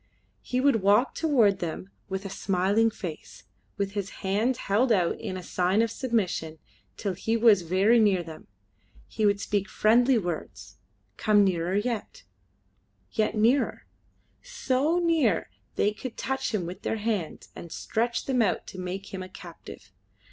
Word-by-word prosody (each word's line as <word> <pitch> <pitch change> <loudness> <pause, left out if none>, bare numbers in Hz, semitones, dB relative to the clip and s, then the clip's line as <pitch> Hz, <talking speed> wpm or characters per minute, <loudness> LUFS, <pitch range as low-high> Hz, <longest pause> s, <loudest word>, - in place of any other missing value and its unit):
He 250 - -2
would 275 -2 +4
walk 205 +6 +3
toward 235 - +3
them 175 +3 -5 0.2
with 190 +1 -4
a - - -4
smiling 195 +4 +1
face, 180 -8 -8 0.3
with 200 -1 -1
his 200 -1 -3 0.2
hands 220 +6 +1
held 230 +6 +1
out 180 -6 +2
in 185 - -5
a 185 - -7
sign 185 +5 +1
of 230 - -1
submission 195 -11 -2 0.4
till 200 -3 -2
he 225 +5 -1
was 220 -4 +5
very 190 +7 +3
near 200 -5 +3
them. 160 -1 -11 0.6
He 215 -1 0
would 200 0 +2
speak 200 0 -1
friendly 240 +5 +4
words 175 -6 -5 0.4
come 210 -2 +4
nearer 180 -1 0
yet 220 +1 -3 0.9
yet 215 0 0
nearer 230 +6 +2 0.6
so 300 - 0
near 315 - +1
that 95 +1 -39
they 205 - +2
could 240 +3 -8
touch 265 0 -2
him 205 -6 -1
with 180 +2 -7
their 225 - -2
hands 210 -6 -3
and 170 - -9
stretch 235 +6 -2
them 260 -3 +1
out 205 -5 0
to 185 - -9
make 185 +2 -6
him 190 - -4
a 185 - -8
captive. - - -12
205 Hz, 160 wpm, -27 LUFS, 185-230 Hz, 0.9 s, was